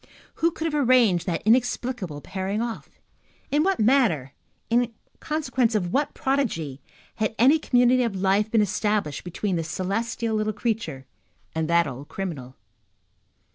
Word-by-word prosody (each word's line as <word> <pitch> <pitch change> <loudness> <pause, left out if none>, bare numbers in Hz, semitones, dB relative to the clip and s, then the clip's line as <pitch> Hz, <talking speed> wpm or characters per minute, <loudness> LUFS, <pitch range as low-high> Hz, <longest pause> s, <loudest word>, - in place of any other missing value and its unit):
Who 335 - +5
could 325 -1 -5
have 295 -5 0
arranged 215 -9 +4
that 170 - -1
inexplicable 240 - 0
pairing 190 +4 -3
off? 235 -1 -4 0.6
In 295 +2 +3
what 385 +4 +1
manner, 210 - +2 0.3
in 240 0 +2 0.3
consequence 260 -7 0
of 180 -4 -1
what 285 +2 0
prodigy, 185 - -1 0.4
had 220 -1 -1
any 275 +7 +5
community 250 -2 +3
of 230 -5 -1
life 195 +3 +2
been 225 -1 +3
established 205 -6 -1
between 180 +1 -2
this 165 -1 -3
celestial 225 +5 -2
little 215 0 0
creature 205 - -3 0.5
and 160 0 -2
that 170 0 +4
old 140 0 -7
criminal? 145 -10 -6
215 Hz, 140 wpm, -25 LUFS, 175-245 Hz, 0.6 s, Who